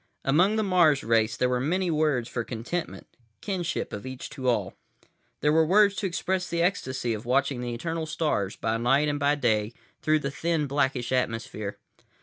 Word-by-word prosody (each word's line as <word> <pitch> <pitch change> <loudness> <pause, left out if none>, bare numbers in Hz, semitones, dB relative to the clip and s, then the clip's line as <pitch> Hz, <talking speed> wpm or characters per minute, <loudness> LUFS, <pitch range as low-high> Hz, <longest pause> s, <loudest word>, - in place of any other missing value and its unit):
Among 175 +10 +4
the 220 - +1
Mars 175 -7 +4
race 110 -1 +2
there 125 - +2
were 125 0 0
many 175 +7 0
words 150 -6 +1
for 120 -1 -3
contentment, 125 +10 -5 0.3
kinship 180 -4 -3
of 100 - -5
each 130 -1 -7
to 130 -3 -1
all. 120 - 0 0.7
There 150 - +3
were 160 0 +5
words 200 +5 +5
to 200 - 0
express 180 +1 -2
the 170 0 0
ecstasy 130 - -1
of 110 0 -5
watching 135 +1 +1
the 120 -1 -3
eternal 165 +5 -3
stars, 150 - -1
by 110 0 -1
night 135 +6 +2
and 145 0 -1
by 145 0 +3
day, 110 -5 0 0.3
through 155 0 +3
the 140 - -3
thin 160 +1 0
blackish 135 -3 0
atmosphere. 115 -4 -2
140 Hz, 180 wpm, -27 LUFS, 120-170 Hz, 0.7 s, were